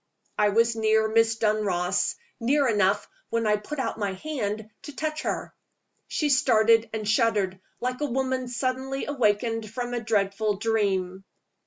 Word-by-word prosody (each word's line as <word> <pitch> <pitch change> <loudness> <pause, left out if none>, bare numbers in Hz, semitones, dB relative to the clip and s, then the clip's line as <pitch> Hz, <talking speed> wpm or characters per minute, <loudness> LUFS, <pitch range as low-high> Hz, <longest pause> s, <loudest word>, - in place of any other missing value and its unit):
I 210 0 +3
was 230 +2 +3
near 220 0 +3
Miss 225 +1 +3
Dunross 200 -4 0 0.2
near 275 +4 +2
enough, 205 -3 +2 0.2
when 230 0 0
I 210 0 +3
put 255 +9 -7
out 265 - -2
my 200 -2 -1
hand, 215 -3 -4
to 295 - -10
touch 310 0 -2
her. - - -3 0.5
She 300 - 0
started 230 -4 +4
and 215 -2 -4
shuddered, 210 -4 +1 0.2
like 250 +2 -3
a 295 - +1
woman 260 0 -1
suddenly 260 +2 -2
awakened 225 -4 0
from 245 +2 -4
a 240 - 0
dreadful 210 -1 0
dream. 195 -4 0
225 Hz, 150 wpm, -26 LUFS, 210-250 Hz, 0.5 s, started